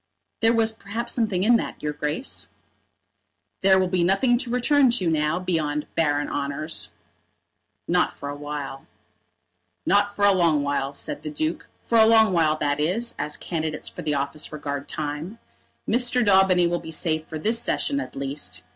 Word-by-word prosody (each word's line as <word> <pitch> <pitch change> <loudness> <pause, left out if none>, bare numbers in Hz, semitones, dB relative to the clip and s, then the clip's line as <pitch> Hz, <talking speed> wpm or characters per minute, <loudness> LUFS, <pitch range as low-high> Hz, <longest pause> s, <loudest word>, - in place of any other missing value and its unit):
"There 225 0 +4
was 225 -1 +3
perhaps 225 +2 -4
something 210 -6 0
in 235 +3 +5
that, - - -6
your 150 0 -1
Grace." 150 - -3 1.1
"There 190 0 +5
will 185 0 +2
be 180 -1 +1
nothing 215 +7 +3
to 245 - -5
return 260 +3 +3
to 235 -7 0
now 155 0 +1
beyond 155 -5 -1
barren 145 -3 +1
honours." 145 +3 -3 1.0
"Not - - +2
for 140 - -9
a 145 - -4
while." 145 -2 -6 1.0
"Not 205 +1 +3
for 205 - +2
a 200 - +6
long 165 -6 +2
while," 140 -1 -2
said - - -4
the 150 - -5
Duke; 155 +2 -3 0.2
"for 230 - +3
a 220 - +7
long 220 -3 +5
while, 155 -3 +2
that 145 -1 -1
is, 205 +10 0
as 150 +1 -3
candidates 155 -3 -3
for - - -9
office 140 +2 -3
regard 145 -2 -5
time. 155 +7 -4 0.5
Mr. 245 0 +2
Daubeny 190 -3 +5
will 170 0 0
be - - -10
safe 160 -1 0
for 160 - -6
this 225 +8 +2
Session 280 +3 +1
at - - -7
least. 135 -9 -3
170 Hz, 170 wpm, -24 LUFS, 150-220 Hz, 1.1 s, a